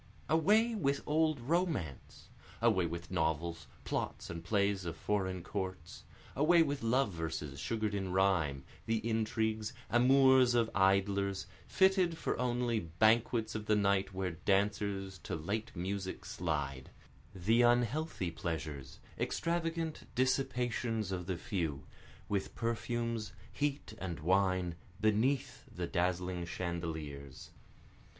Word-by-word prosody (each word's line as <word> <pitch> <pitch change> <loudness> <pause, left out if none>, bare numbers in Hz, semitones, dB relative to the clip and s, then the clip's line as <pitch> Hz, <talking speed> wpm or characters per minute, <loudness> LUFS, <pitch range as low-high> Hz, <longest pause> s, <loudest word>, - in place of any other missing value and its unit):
Away 210 +9 +4
with 140 -9 0
old 155 -1 +2
romance! 130 - -2 0.3
Away 110 -7 +3
with 85 +1 -6
novels, 80 -1 -1 0.2
plots - - -3
and 85 0 -6
plays 100 -2 +1
of 85 -2 -5
foreign 95 -2 -1
courts, 95 -4 -5 0.3
Away 165 +4 +5
with 145 -2 -2
love 115 -2 +2
verses 80 -4 -4
sugar'd 110 +2 -1
in 95 -2 -2
rhyme, 85 -8 +2 0.2
the 115 0 0
intrigues, 110 -1 0 0.2
amours 130 0 +6
of 115 -1 +2
idlers, 100 0 +2 0.2
Fitted 190 -3 +3
for - - -1
only 120 -2 +1
banquets 110 +6 +2
of 110 -1 -5
the 110 - +4
night 100 -1 +2
where 95 -1 -2
dancers 95 +1 0
to - - -4
late 100 +8 -3
music 95 +2 -4
slide, 70 -1 -3 0.5
The 110 +6 +3
unhealthy 120 - +2
pleasures, 80 -5 -5 0.2
extravagant 165 -1 -1
dissipations 125 -5 0
of 90 -2 -3
the 95 -2 -1
few, 85 -9 -3 0.4
With 100 -2 -2
perfumes, 115 -1 -2 0.2
heat 145 -5 -2
and 85 -5 -4
wine, 95 +1 +2 0.3
beneath 125 +5 +1
the 90 0 -3
dazzling 90 0 -1
chandeliers. 80 -6 -5
100 Hz, 115 wpm, -34 LUFS, 90-120 Hz, 0.5 s, amours